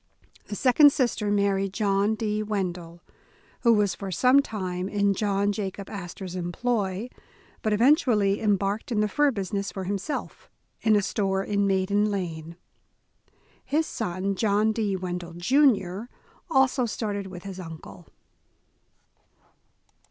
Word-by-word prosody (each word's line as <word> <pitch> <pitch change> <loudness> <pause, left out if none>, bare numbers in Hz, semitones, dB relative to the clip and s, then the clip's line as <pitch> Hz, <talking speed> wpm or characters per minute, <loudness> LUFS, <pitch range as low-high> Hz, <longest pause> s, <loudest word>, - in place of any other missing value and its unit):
The 205 - -5
second 270 +5 +6
sister 240 -6 0
married 200 -1 +1
John 205 0 +1
D. 215 -1 -1
Wendel, 180 -5 -4 0.6
who 235 - +4
was 210 -4 +3
for 195 - -6
some 255 +9 +5
time 185 -6 -4
in 200 -1 +2
John 200 0 0
Jacob 200 -1 -5
Astor 190 -1 -7
's 180 - -7
employ, 190 +3 -2 0.5
but 215 - 0
eventu 255 +6 +4
ally 200 -3 +3
embarked 205 +2 0
in 220 - +1
the 210 - +2
fur 295 +7 +2
business 200 -3 -3
for 190 - -5
himself, 200 +8 -4 0.3
in 220 -1 +4
a 205 - +2
store 195 -1 0
in 200 0 0
Maiden 200 +2 +1
Lane. 170 -4 -4 1.1
His 310 +3 0
son, 195 - -2
John 210 +2 +2
D. 210 -3 -1
Wendel, 180 -2 -5
Jr., 200 - +2 0.4
also 265 -4 +3
started 205 -3 -3
with 180 -2 -9
his 195 -1 -7
uncle. 155 - -10
200 Hz, 135 wpm, -26 LUFS, 190-220 Hz, 1.1 s, second